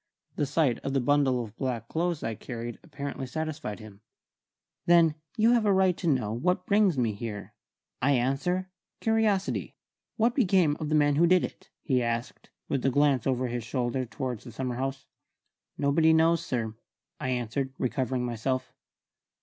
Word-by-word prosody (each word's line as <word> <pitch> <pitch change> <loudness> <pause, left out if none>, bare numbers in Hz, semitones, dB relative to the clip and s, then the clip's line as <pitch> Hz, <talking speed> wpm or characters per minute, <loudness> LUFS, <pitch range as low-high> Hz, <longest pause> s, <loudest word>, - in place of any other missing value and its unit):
The 145 - 0
sight 140 -4 +1
of 135 - -4
the 135 - +3
bundle 130 -1 +2
of 110 -1 -11
black 120 -4 -3
clothes 170 +1 -1
I 115 - -1
carried 120 +1 -6
apparently 140 -4 -6
satisfied 155 -7 -4
him. 105 -2 -12 0.9
"Then 170 -2 +6 0.2
you 225 +2 +5
have 235 -2 +3
right 190 -3 +4
to 160 -7 +2
ask 110 0 -4
what 180 +1 +1
brings 200 -6 +3
me 115 -4 +1
here. 105 -1 -6 0.5
I 140 +3 +3
answer, 150 +9 0 0.3
curiosity. 220 -3 0 0.4
What 230 +1 +3
became 185 - +3
of 155 - -3
the 155 - +2
man 145 -1 +3
who 170 +2 +5
did 180 0 +4
it?" - - -7
he 130 -3 +2
asked, 115 +1 -3 0.2
with 135 -3 -1
a 135 - +3
glance 140 -2 +2
over 130 -1 +1
his 120 -1 -3
shoulder 125 +1 -1
towards 125 -1 -4
the 120 - -10
summer 125 +1 -3
house. 135 +1 -3 0.7
"Nobody 160 +3 +4
knows, 165 +1 +3
sir," 115 -8 -2 0.5
I 130 - -2
answered, 125 +2 -2
recovering 130 -1 -1
myself. 125 +2 -2
135 Hz, 165 wpm, -28 LUFS, 120-165 Hz, 0.9 s, Then